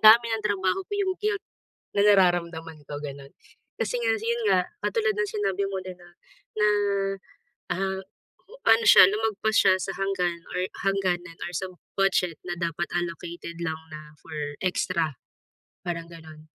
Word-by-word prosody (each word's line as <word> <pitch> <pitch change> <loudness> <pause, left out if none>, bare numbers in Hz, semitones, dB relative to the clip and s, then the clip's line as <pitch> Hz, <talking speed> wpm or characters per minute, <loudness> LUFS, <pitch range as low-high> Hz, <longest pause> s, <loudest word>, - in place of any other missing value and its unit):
dami 225 +2 +8
ng 220 -1 -2
trabaho 195 - +1
ko, - - -11
'yong 385 -2 +1
guilt, 415 -1 -1 0.5
na 200 - +1
nararamdaman 170 -5 +2
ko 145 - -5
ganun. 140 -1 -8 0.4
Kasi - - -1
nga - - +2
si 425 - -7
'yon 470 0 -2
nga, - - +5 0.2
katulad 445 -2 +1
ng 445 -2 0
sinabi 200 - -1
mo 195 - -3
din 185 -1 -7
na 175 - -15 0.5
na 210 0 +4 1.0
ah, 190 +1 -1 0.7
ano 225 0 +6
siya, 200 - +10
lumagpas 220 +1 0
siya 190 -1 +6
sa 195 - -2
hanggan 180 -3 -1
or 180 +1 0 0.2
hangganan 185 -3 0
or - - -4
sa 190 - -3 0.3
budget 185 -4 +2
na 175 - -2
dapat 170 0 -1
allocated 170 0 -4
lang 160 -1 -1
na 155 -1 -10
for 150 -1 -5
extra, 170 -5 0 0.7
parang 170 -2 -4
ganun. 160 -2 -12
185 Hz, 155 wpm, -26 LUFS, 170-210 Hz, 1.0 s, siya